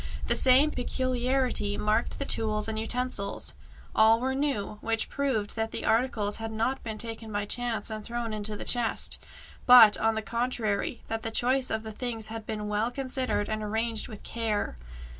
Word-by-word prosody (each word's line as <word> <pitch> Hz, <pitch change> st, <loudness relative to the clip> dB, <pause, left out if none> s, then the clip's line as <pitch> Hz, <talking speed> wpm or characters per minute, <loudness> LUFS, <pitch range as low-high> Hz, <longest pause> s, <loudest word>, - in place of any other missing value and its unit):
The -, -, +2 dB
same 265 Hz, +4 st, +5 dB
peculiarity 255 Hz, -4 st, 0 dB
marked 215 Hz, +2 st, 0 dB
the 280 Hz, -, -3 dB
tools 215 Hz, -4 st, +1 dB
and 220 Hz, -1 st, -3 dB
utensils; 225 Hz, -3 st, -1 dB, 0.4 s
all 220 Hz, +1 st, +5 dB
were 260 Hz, +2 st, -1 dB
new, 265 Hz, -7 st, -2 dB
which 225 Hz, 0 st, -1 dB
proved 255 Hz, -8 st, -1 dB
that 225 Hz, 0 st, -1 dB
the -, -, -5 dB
articles 225 Hz, -3 st, +1 dB
had 225 Hz, 0 st, -5 dB
not 230 Hz, +5 st, -1 dB
been 220 Hz, -2 st, -5 dB
taken 225 Hz, 0 st, -4 dB
by 205 Hz, -1 st, -2 dB
chance 230 Hz, -1 st, -1 dB
and 215 Hz, -1 st, -5 dB
thrown 235 Hz, -1 st, -4 dB
into 210 Hz, 0 st, -2 dB
the -, -, -7 dB
chest, 240 Hz, -2 st, +2 dB, 0.5 s
but, 240 Hz, -4 st, +9 dB
on 225 Hz, 0 st, +2 dB
the 220 Hz, -, -3 dB
contrary, 230 Hz, -2 st, -2 dB
that 225 Hz, 0 st, -4 dB
the 225 Hz, -, -3 dB
choice 255 Hz, +3 st, +1 dB
of 220 Hz, 0 st, -2 dB
the 220 Hz, -, -6 dB
things 225 Hz, -1 st, -3 dB
had 225 Hz, -1 st, -7 dB
been 210 Hz, -1 st, -4 dB
well 210 Hz, +2 st, 0 dB
considered 255 Hz, -4 st, -2 dB
and 215 Hz, 0 st, -3 dB
arranged 220 Hz, +1 st, -1 dB
with 215 Hz, -4 st, -10 dB
care. 220 Hz, -, -2 dB
225 Hz, 180 wpm, -28 LUFS, 215-250 Hz, 0.5 s, but